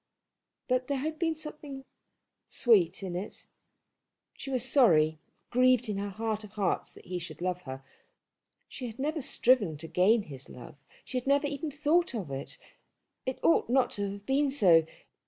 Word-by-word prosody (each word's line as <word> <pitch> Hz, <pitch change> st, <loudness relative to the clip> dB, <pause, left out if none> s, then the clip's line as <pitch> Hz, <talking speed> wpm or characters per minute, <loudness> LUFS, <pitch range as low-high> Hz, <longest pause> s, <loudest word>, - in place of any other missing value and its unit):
But 255 Hz, 0 st, 0 dB
there 280 Hz, -, -1 dB
had 310 Hz, +3 st, -3 dB
been 325 Hz, -2 st, +1 dB
something 300 Hz, -3 st, -8 dB, 0.6 s
sweet 195 Hz, -7 st, +3 dB
in 180 Hz, -2 st, -4 dB
it. 190 Hz, +4 st, -6 dB, 0.9 s
She 275 Hz, -, -8 dB
was 255 Hz, -1 st, +1 dB
sorry, 160 Hz, -, +4 dB, 0.3 s
grieved 250 Hz, -1 st, +3 dB
in 205 Hz, -, -2 dB
her 200 Hz, +1 st, -3 dB
heart 215 Hz, +1 st, -3 dB
of 210 Hz, -1 st, -12 dB
hearts 200 Hz, -4 st, -1 dB
that -, -, -16 dB
he 180 Hz, 0 st, -4 dB
should 160 Hz, -3 st, -8 dB
love 180 Hz, 0 st, -2 dB
her. 130 Hz, 0 st, -7 dB, 0.8 s
She 255 Hz, -, -7 dB
had 225 Hz, 0 st, -9 dB
never 305 Hz, +3 st, -2 dB
striven 230 Hz, -, +2 dB
to 165 Hz, +2 st, -8 dB
gain 205 Hz, +6 st, +3 dB
his 140 Hz, -5 st, -10 dB
love. 125 Hz, -, -11 dB, 0.3 s
She 255 Hz, -, -2 dB
had 250 Hz, -, -12 dB
never 280 Hz, +1 st, +3 dB
even 290 Hz, +2 st, -3 dB
thought 300 Hz, +2 st, +1 dB
of 185 Hz, -11 st, -4 dB
it. 135 Hz, +1 st, -5 dB, 0.7 s
It 260 Hz, -, -2 dB
ought 165 Hz, +6 st, +3 dB
not 255 Hz, 0 st, +3 dB
to 200 Hz, -2 st, -2 dB
have 200 Hz, 0 st, -11 dB
been 275 Hz, +3 st, +2 dB
so. 175 Hz, -, +5 dB
225 Hz, 175 wpm, -29 LUFS, 180-270 Hz, 0.9 s, so